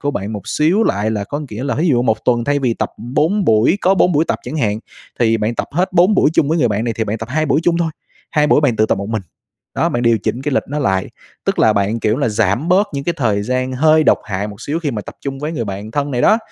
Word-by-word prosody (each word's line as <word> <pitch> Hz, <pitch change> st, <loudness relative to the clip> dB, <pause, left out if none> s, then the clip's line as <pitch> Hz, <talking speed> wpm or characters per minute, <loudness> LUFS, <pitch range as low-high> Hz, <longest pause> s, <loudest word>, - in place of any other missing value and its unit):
của 145 Hz, -, -1 dB
bạn 100 Hz, -4 st, -4 dB
một 105 Hz, -2 st, -7 dB
xíu 165 Hz, +8 st, +2 dB
lại, 105 Hz, +2 st, 0 dB
là 105 Hz, -2 st, -2 dB
có 145 Hz, +7 st, -4 dB
nghĩa 110 Hz, +5 st, -5 dB
là 140 Hz, -, -1 dB
thí 165 Hz, -, +1 dB
dụ 120 Hz, -5 st, +3 dB
1 110 Hz, -3 st, 0 dB
tuần 120 Hz, -2 st, +2 dB
thay 145 Hz, +2 st, +1 dB
vì 125 Hz, -4 st, 0 dB
tập -, -, -3 dB
4 155 Hz, -, 0 dB
buổi 110 Hz, -, +3 dB
có 190 Hz, -, +3 dB
4 180 Hz, -1 st, +3 dB
buổi 155 Hz, +1 st, +3 dB
tập -, -, 0 dB
chẳng 155 Hz, -, -6 dB
hạn 110 Hz, -6 st, 0 dB, 0.4 s
thì 115 Hz, -1 st, +3 dB
bạn 110 Hz, +1 st, -1 dB
tập -, -, -3 dB
hết 180 Hz, +5 st, 0 dB
4 180 Hz, +4 st, +4 dB
buổi 155 Hz, -, +3 dB
chung 140 Hz, -, +3 dB
với 165 Hz, +2 st, +1 dB
người 125 Hz, -6 st, +3 dB
bạn 105 Hz, +1 st, -1 dB
này 115 Hz, -1 st, -2 dB
thì 110 Hz, -, -1 dB
bạn 110 Hz, +1 st, -3 dB
tập 115 Hz, +1 st, -6 dB
2 155 Hz, +3 st, 0 dB
buổi 150 Hz, -, +2 dB
chung 170 Hz, 0 st, +2 dB
thôi, 165 Hz, -2 st, 0 dB, 0.4 s
2 150 Hz, -1 st, +2 dB
buổi 150 Hz, -, +4 dB
bạn 135 Hz, -6 st, +1 dB
tự 110 Hz, -, +3 dB
tập -, -, 0 dB
một 100 Hz, +1 st, -5 dB
mình. 110 Hz, -2 st, -2 dB, 0.5 s
Đó, -, -, +1 dB
bạn 120 Hz, -, -2 dB
điều 115 Hz, -2 st, +3 dB
chỉnh 120 Hz, +5 st, -3 dB
cái 145 Hz, +1 st, -2 dB
lịch -, -, +2 dB
nó 145 Hz, +2 st, -3 dB
lại, 95 Hz, -9 st, 0 dB, 0.3 s
tức -, -, -1 dB
là -, -, +5 dB
bạn, 100 Hz, +3 st, 0 dB
kiểu 110 Hz, +1 st, +1 dB
là, 140 Hz, -3 st, 0 dB
giảm 110 Hz, -, 0 dB
bớt 195 Hz, +4 st, +3 dB
những 140 Hz, 0 st, -3 dB
cái 175 Hz, -, 0 dB
thời 110 Hz, -8 st, 0 dB
gian 130 Hz, +3 st, -1 dB
hơi 155 Hz, +4 st, +4 dB
độc -, -, +4 dB
hại 100 Hz, +1 st, -3 dB
một 105 Hz, 0 st, -11 dB
xíu 150 Hz, +3 st, -2 dB
khi 155 Hz, -4 st, -1 dB
mà 105 Hz, -3 st, -4 dB
tập -, -, -11 dB
chung 135 Hz, -1 st, -5 dB
với 150 Hz, +3 st, -4 dB
người 120 Hz, -8 st, -3 dB
bạn 100 Hz, +1 st, -6 dB
thân 145 Hz, +4 st, -2 dB
này 125 Hz, -3 st, -1 dB
đó. 220 Hz, -, +5 dB
125 Hz, 300 wpm, -17 LUFS, 110-150 Hz, 0.5 s, là